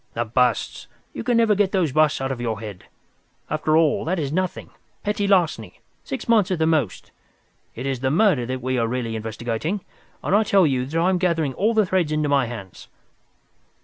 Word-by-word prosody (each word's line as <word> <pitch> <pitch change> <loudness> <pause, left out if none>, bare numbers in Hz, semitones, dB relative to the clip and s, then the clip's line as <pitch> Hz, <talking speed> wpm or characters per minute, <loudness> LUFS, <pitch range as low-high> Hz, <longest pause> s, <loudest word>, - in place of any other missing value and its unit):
"The 120 - -1
busts! 125 +1 0 0.3
You - - -5
never 230 -2 +3
can - - -2
get 200 -1 +2
those 180 -7 +1
busts 155 -1 +2
out 135 0 -2
of 125 -2 -4
your 110 -3 -2
head. 105 -5 -9 0.7
After 155 0 +2
all, 160 -2 +2
that 185 +4 -1
is 145 -4 -2
nothing; 185 +1 -2 0.3
petty 205 0 -1
larceny, 185 -5 +1 0.2
six 270 - -6
months 220 -5 +3
at 185 - 0
the 160 - +1
most. 150 - -1 0.6
It 125 - -6
is 135 -2 -2
the 130 +1 0
murder 155 - +2
that 130 -1 -4
we 130 0 0
are 115 - +1
really 115 -1 -3
investigating, 115 - -3 0.4
and 195 - +1
I 210 - +5
tell 200 -4 +4
you 130 -3 0
that 160 +4 -1
I 175 +2 +3
am 185 - +1
gathering 165 -6 0
all 220 - +1
the 215 -2 +4
threads 180 -4 0
into 155 -1 0
my 140 -3 +2
hands." 105 -6 -9
155 Hz, 205 wpm, -23 LUFS, 125-185 Hz, 0.7 s, I